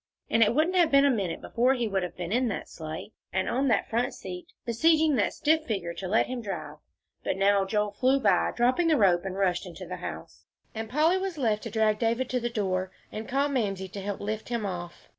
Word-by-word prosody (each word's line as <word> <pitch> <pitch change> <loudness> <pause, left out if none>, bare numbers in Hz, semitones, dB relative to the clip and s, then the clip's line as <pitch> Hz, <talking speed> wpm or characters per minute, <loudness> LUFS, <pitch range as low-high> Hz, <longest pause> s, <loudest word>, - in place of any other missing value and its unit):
And 225 - +3
it 225 +2 +4
wouldn't 330 +5 +2
have 340 -3 +5
been 275 -1 +5
a 280 - +5
minute 195 -8 -2
before 250 +3 +2
he 240 -3 -1
would 195 -2 0
have 180 - -5
been 175 0 -4
in 250 +3 +2
that 215 - -3
sleigh, 160 +5 -7 0.2
and 190 0 0
on 270 +3 +1
that 225 -5 +2
front 235 +2 -1
seat, 180 -1 -8 0.2
besieging 315 +6 +3
that 205 - +2
stiff 315 +1 +1
figure 185 -6 -2
to 185 - -6
let 215 +5 +3
him 250 -1 -4
drive. 200 -4 -6 0.5
But - - -1
now 200 0 +3
Joel 210 +1 0
flew 260 +6 +2
by, 225 - +3
dropping 255 +8 +2
the 315 -2 +4
rope, 185 -5 +3
and 190 0 -4
rushed 185 -1 0
into 180 +1 -8
the 180 +1 -6
house, 80 - -8 0.3
and 220 0 -5
Polly 315 +7 +3
was 380 -3 -3
left 220 -6 +1
to - - -3
drag 215 -1 +1
David 235 +2 0
to 255 - +1
the 240 0 -2
door, 190 -4 -1 0.2
and 215 +1 -6
call 275 +2 +2
to 285 - -4
Mamsie 195 -6 -1
to 200 +1 -7
help 200 0 -4
lift 215 +2 -4
him 235 -3 -1
off. 175 -3 -6
220 Hz, 235 wpm, -28 LUFS, 190-255 Hz, 0.5 s, have